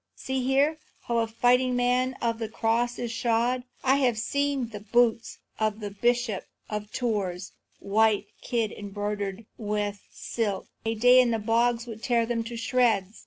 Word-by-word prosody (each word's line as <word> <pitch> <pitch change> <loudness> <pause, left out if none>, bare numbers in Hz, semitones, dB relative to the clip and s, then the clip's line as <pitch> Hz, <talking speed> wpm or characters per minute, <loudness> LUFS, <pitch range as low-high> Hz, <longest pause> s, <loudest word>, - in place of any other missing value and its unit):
"See 265 -1 -3
here, 280 +4 +2 0.2
how 235 -1 0
a 225 - +1
fighting 250 +3 +2
man 250 +1 +1
of 230 -1 0
the 225 -2 -3
cross 230 +2 0
is 240 -1 -3
shod! 235 +1 +1 0.2
I 265 +1 +4
have 250 -5 +2
seen 280 +1 -1
the 210 -2 -7
boots 230 +2 +1 0.2
of 215 0 0
the 205 -2 -5
Bishop 240 0 0 0.2
of 210 0 -4
Tours, 195 -7 -2 0.3
white 215 +1 +2 0.2
kid, 230 -4 -1 0.2
broidered 205 0 -3
with 205 -2 -2
silk; 210 -5 -3 0.2
a 225 0 0
day 245 +3 +7
in 245 - +2
the 230 - +1
bogs 230 +2 +1
would 225 -2 -8
tear 235 -2 +2
them 230 0 -1
to 235 0 -6
shreds. 225 -4 +1
230 Hz, 165 wpm, -27 LUFS, 215-245 Hz, 0.3 s, day